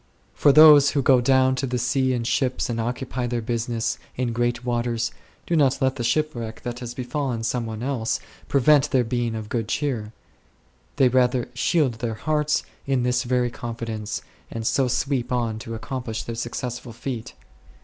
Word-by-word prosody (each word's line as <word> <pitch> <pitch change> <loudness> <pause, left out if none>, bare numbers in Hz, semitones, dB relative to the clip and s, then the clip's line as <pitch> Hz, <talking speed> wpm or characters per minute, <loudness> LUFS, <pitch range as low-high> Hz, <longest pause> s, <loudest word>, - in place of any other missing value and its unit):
For 145 - +4
those 150 -1 +8
who 140 -2 0
"go 130 -1 +5
down 130 +1 +4
to 135 - -1
the 125 0 -1
sea 130 +2 +1
in 120 -2 -1
ships 125 +1 0
and 115 -1 -1
occupy 125 +1 -3
their 120 0 -1
business 115 0 -2 0.2
in 120 -2 -1
great 120 +1 -1
waters 120 -1 -1 0.2
" - - -33
do 170 - 0
not 140 -4 +3
let 130 -1 +1
the 120 - -2
shipwreck 120 -4 -1
that 120 -1 -4
has 120 -1 -7
be 130 - -4
fallen 125 -2 -2
some 115 0 -1
one 110 +1 -5
else 130 -3 -1 0.3
prevent 145 +1 +4
their 130 -3 +3
being 120 -1 -1
of 110 -1 -5
good 115 -1 -2
cheer; 120 -6 -2 0.8
they 135 -3 +5
rather 125 -1 +2
shield 130 -2 +1
their 115 -2 -2
hearts 150 +4 0 0.2
in 135 -3 +1
this 125 0 +1
very 125 -1 0
confidence, 115 -3 -5 0.3
and 115 -1 -5
so 130 +3 +2
sweep 130 0 -1
on 115 -3 -1
to 115 +1 -6
accomplish 115 -1 -4
their 115 - -5
successful 120 +1 -5
feat. 115 -1 -6
125 Hz, 180 wpm, -24 LUFS, 115-130 Hz, 0.8 s, those